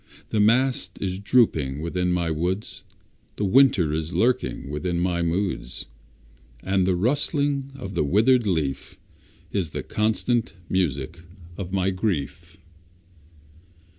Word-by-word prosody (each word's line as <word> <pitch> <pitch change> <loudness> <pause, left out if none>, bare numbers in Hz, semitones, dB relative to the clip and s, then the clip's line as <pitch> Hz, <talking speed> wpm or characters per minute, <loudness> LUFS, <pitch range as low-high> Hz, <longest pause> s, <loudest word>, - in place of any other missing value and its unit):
The 110 - 0
mast 125 +5 +2
is 95 -1 -2
dropping 80 - +2
within 90 +3 -1
my 85 -2 0
woods, 90 +6 -3 0.5
The 105 - -1
winter 100 - +4
is 80 +2 -3
lurking 95 - 0
within 85 +3 -2
my 85 -1 0
moods, 85 -7 -2 0.8
And 95 -1 +1
the 95 - +2
rustling 140 - 0
of 110 -8 -7
the 85 - +1
withered 110 - +3
leaf 80 -7 -2 0.5
Is 95 -6 -1
the - - -5
constant 110 +2 0
music 80 -4 -1 0.4
of 95 -1 -6
my 95 0 +1
grief. 95 -6 -3
95 Hz, 120 wpm, -24 LUFS, 85-110 Hz, 0.8 s, winter